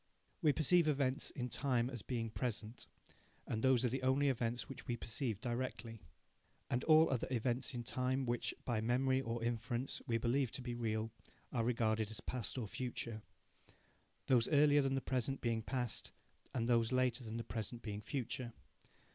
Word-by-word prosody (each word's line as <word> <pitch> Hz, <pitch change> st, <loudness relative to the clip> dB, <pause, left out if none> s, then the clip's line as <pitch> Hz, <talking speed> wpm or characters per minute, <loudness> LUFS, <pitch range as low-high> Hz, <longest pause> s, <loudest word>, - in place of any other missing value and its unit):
We 155 Hz, -4 st, +5 dB
perceive 165 Hz, +3 st, +4 dB
events 140 Hz, -3 st, +1 dB
in 125 Hz, -3 st, -3 dB
time 125 Hz, -2 st, +1 dB
as 125 Hz, -4 st, -5 dB
being 115 Hz, -3 st, -3 dB
present, 115 Hz, -1 st, -3 dB, 0.6 s
and 110 Hz, -, -2 dB
those 130 Hz, -1 st, +4 dB
are -, -, +3 dB
the 130 Hz, +2 st, -2 dB
only 135 Hz, +2 st, +3 dB
events 120 Hz, -1 st, -1 dB
which 135 Hz, -, -9 dB
we 120 Hz, -2 st, -1 dB
perceive 115 Hz, -2 st, -2 dB
directly. 120 Hz, -2 st, -3 dB, 0.7 s
And 120 Hz, +2 st, +1 dB
all 160 Hz, -1 st, +7 dB
other 130 Hz, -, 0 dB
events 125 Hz, +1 st, 0 dB
in 120 Hz, -, -3 dB
time 130 Hz, +3 st, 0 dB
which, 120 Hz, -1 st, 0 dB
by 115 Hz, -3 st, 0 dB
memory 130 Hz, +3 st, +2 dB
or 115 Hz, -2 st, -3 dB
inference, 120 Hz, +2 st, -2 dB
we 115 Hz, -2 st, +2 dB
believe 125 Hz, +3 st, +1 dB
to -, -, -2 dB
be 120 Hz, -1 st, -3 dB
real, 110 Hz, -1 st, -1 dB, 0.4 s
are 120 Hz, -3 st, +1 dB
regarded 110 Hz, -2 st, +1 dB
as 110 Hz, -, -5 dB
past 115 Hz, -2 st, -3 dB
or 120 Hz, -, -1 dB
future 115 Hz, -1 st, -4 dB, 1.0 s
those 125 Hz, -4 st, +4 dB
earlier 145 Hz, 0 st, +5 dB
than 135 Hz, -1 st, +1 dB
the 135 Hz, -, 0 dB
present 130 Hz, +1 st, 0 dB
being 115 Hz, -2 st, 0 dB
past, 120 Hz, 0 st, -3 dB, 0.4 s
and 115 Hz, -2 st, -1 dB
those 115 Hz, -1 st, +3 dB
later 130 Hz, -1 st, +2 dB
than 110 Hz, 0 st, -5 dB
the 115 Hz, -, -3 dB
present 115 Hz, +2 st, -4 dB
being 105 Hz, -1 st, -4 dB
future. 120 Hz, 0 st, -3 dB
120 Hz, 170 wpm, -37 LUFS, 115-130 Hz, 1.0 s, all